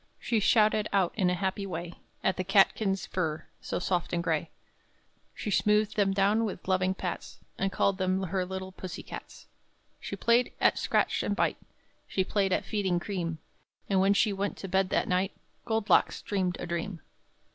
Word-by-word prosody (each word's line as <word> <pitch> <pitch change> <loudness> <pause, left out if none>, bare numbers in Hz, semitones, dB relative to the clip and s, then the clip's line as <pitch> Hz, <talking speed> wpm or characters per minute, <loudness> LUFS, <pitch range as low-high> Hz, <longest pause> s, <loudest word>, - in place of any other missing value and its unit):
She 230 - +1
shouted 215 0 +3
out, 195 -3 +2
in 185 -4 +2
a 180 - +1
happy 195 +1 -2
way, 175 -1 -5 0.3
At 190 - +2
the 185 - -2
catkins' 195 +1 +3
fur, 160 -4 -2 0.2
so - - -3
soft 180 -1 -1
and 170 0 0
gray; 165 -1 0 0.9
She 210 - -4
smoothed 210 +2 +2
them 200 -2 +3
down 200 +3 +3
with 195 -5 -4
loving 185 0 +2
pats, - - -5 0.2
And 195 0 0
called 195 0 +1
them 185 +1 +1
her 185 +1 -1
little 190 +1 -5
pussie 185 -1 -7
cats. - - -9 0.5
She - - -5
played 235 +1 +2
at - - +3
scratch - - +1
and - - -1
bite; - - +1 0.5
She 190 - 0
played 195 0 0
at - - +1
feeding 190 -5 0
cream; 175 -4 -3 0.5
And 195 -2 +2
when 195 +2 +4
she 210 0 +3
went 200 +1 -2
to 195 - -6
bed 190 0 +1
that - - +1
night, 185 +2 +1 0.3
Gold 220 -2 -1
Locks - - +3
dreamed 185 -3 -1
a - - -4
dream. 170 0 -4
190 Hz, 180 wpm, -29 LUFS, 180-200 Hz, 0.9 s, when